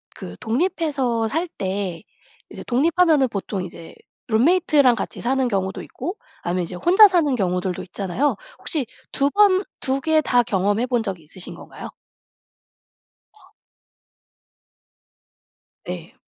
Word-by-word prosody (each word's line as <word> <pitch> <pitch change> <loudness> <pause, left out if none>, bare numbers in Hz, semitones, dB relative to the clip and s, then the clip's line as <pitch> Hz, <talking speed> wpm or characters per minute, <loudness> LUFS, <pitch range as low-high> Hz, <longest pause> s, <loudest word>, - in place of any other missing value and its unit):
그 90 0 -8
독립해서 260 -4 0
살 325 +9 -1
때 190 -3 -3 0.5
이제 - - -9
독립하면은 310 +2 +3
보통 200 -2 -4
이제 170 -2 -10 0.3
룸메이트랑 275 +1 +4
같이 200 - -5
사는 260 +1 +1
경우도 190 -3 -2
있고 375 +5 -6 0.2
아니면 180 +1 -1
이제 175 +2 -6
혼자 375 - +7
사는 310 -8 +2
경우들도 180 -3 -1
있잖아요. 195 +9 -1 0.2
혹시 295 -7 -2 0.3
2 280 +1 +1
번 400 +1 +4 0.2
2 270 +1 -1
개 315 +1 +3
다 245 -3 +3
경험해 205 +4 +1
본 245 -3 0
적 195 -5 -4
있으신 165 +4 -9
건가요? - - -10 1.4
아. 430 - -24 2.3
네. - - -7
245 Hz, 245 characters per minute, -22 LUFS, 190-310 Hz, 2.3 s, 혼자